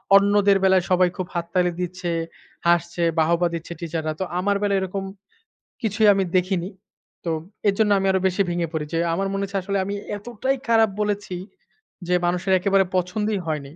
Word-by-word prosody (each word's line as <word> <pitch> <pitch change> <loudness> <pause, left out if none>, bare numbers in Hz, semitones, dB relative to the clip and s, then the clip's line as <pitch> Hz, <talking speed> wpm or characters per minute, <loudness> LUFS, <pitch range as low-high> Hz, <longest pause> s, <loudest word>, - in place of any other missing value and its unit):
অন্যদের 200 0 +5
বেলায় 190 -1 +4
সবাই 180 0 +4
খুব 185 - -3
হাত 170 -1 -1
তালি 180 -1 +2
দিচ্ছে 180 0 -4 0.6
হাসছে, 170 0 +2 0.2
বাহবা 170 +2 +3
দিচ্ছে 170 +1 -5
টিচাররা 160 -2 -3
তো - - +1
আমার 200 +2 +1
বেলায় 200 -1 +2
এরকম 190 +1 -3 0.8
কিছুই 215 -1 +2
আমি 195 -1 +1
দেখিনি। 185 0 0 0.6
তো 165 - 0 0.4
এর 200 - +4
জন্য 210 -1 +3
আমি 195 - 0
আরো 190 - +2
বেশি 185 +2 0
ভেঙে 175 -1 -1
পড়ি 155 -1 -2
যে 165 - +1
আমার 195 +3 0
মনে 195 0 -1
হচ্ছে 195 0 -4
আসলে 200 +1 -1
আমি 200 +1 -3 0.2
এতটাই 240 +5 -2
খারাপ 225 -1 +4
বলেছি। 205 -3 -2 0.7
যে 180 - +2
মানুষের 180 +2 0
একেবারে 195 0 +3
পছন্দই 210 +3 -1
হয়নি। 150 -2 -3
190 Hz, 175 wpm, -23 LUFS, 175-200 Hz, 0.8 s, অন্যদের